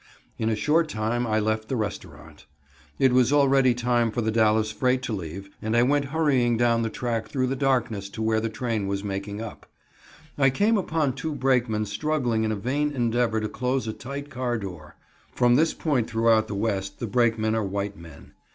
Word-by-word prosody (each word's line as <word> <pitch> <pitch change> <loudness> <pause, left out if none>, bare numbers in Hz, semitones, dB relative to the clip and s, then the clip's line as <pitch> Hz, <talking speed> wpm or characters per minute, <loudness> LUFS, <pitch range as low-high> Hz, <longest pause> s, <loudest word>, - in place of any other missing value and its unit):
In 110 - 0
a 110 - +1
short 155 +8 +2
time 120 +1 -1
I 110 0 +1
left 110 0 -1
the 130 - -2
restaurant. 80 -9 -6 0.5
It 130 -2 +3
was 125 0 +4
already 135 -3 +4
time 120 -1 +1
for 120 +2 -2
the 110 0 0
Dallas 110 -1 +2
freight 125 +3 0
to 115 - -3
leave, 95 +1 -6
and 110 +2 0
I 120 - +5
went 140 +2 +2
hurrying 135 -6 +1
down 115 -1 +2
the 115 - -1
track 115 -1 -3
through 130 +3 -1
the 130 +1 -1
darkness 125 -7 0
to - - -3
where 110 0 +2
the 115 +1 -2
train 115 -3 -2
was 100 0 -2
making 100 +1 -4
up. 115 - -9 0.7
I 135 -1 +5
came 205 - +2
upon 160 -8 0
two 150 +3 -4
brakemen 120 -5 +1
struggling 120 0 -1
in 110 - 0
a - - 0
vain 140 +8 -1
endeavor 120 -3 0
to 105 - -1
close 125 +2 -2
a 110 - -2
tight 140 +4 -7
car 125 -1 -2
door. 90 -7 -8 0.4
(From 120 -1 +4
this 155 +5 +3
point 135 -8 0
throughout 115 -1 +3
the 105 - -5
West 100 -2 -2
the - - -4
brakemen 110 -1 +1
are 110 -1 0
white 100 +1 -3
men.) 80 -3 -14
115 Hz, 200 wpm, -25 LUFS, 110-130 Hz, 0.7 s, I